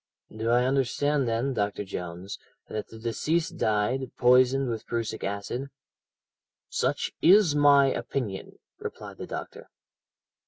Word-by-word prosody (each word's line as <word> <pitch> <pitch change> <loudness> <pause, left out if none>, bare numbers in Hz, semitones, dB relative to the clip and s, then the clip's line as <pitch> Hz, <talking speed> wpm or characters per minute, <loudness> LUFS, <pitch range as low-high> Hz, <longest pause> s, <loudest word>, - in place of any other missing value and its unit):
"'Do 110 +1 -2
I 120 +1 +4
understand, 135 +1 +1
then, 115 +4 0
Dr. 105 -2 -1
Jones, 90 0 -6 0.3
that 105 - -5
the 110 - -12
deceased 155 +9 -1
died, 115 +5 0
poisoned 130 +2 +4
with 115 -2 -4
prussic 115 -1 -3
acid?' 100 +7 -4 1.0
"'Such - - -1
is 185 -2 +6
my 145 -1 +6
opinion,' 125 -6 -3 0.2
replied - - -7
the - - -6
doctor. - - -7
125 Hz, 120 wpm, -27 LUFS, 110-135 Hz, 1.0 s, is